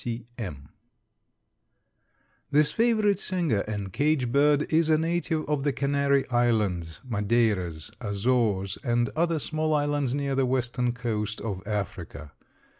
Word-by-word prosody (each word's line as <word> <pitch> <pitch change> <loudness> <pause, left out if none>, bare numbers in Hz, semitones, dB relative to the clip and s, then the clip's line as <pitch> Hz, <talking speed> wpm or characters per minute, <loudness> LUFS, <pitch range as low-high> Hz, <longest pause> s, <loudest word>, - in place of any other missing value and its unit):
_) - - -13
C. 115 -1 -2
C. - - -22
M. 75 - -6 1.8
This 150 +1 +3
favorite 215 -2 +2
singer 170 - 0
and 100 -3 -4
cage 145 -5 +1
bird 145 +2 +4
is 160 0 +3
a 155 - +5
native 165 0 -1
of 150 -2 0
the 145 - +2
Canary 140 +1 +1
Islands, 105 -10 0
Madeiras, 100 -7 0
Azores 100 -2 0
and 120 -1 +1
other 165 +2 0
small 155 +1 -1
islands 145 -3 0
near 140 -1 -1
the 135 -1 +2
western 125 -1 0
coast 110 -4 -3
of 100 -4 -4
Africa. 95 -7 -4
125 Hz, 135 wpm, -27 LUFS, 105-150 Hz, 1.8 s, a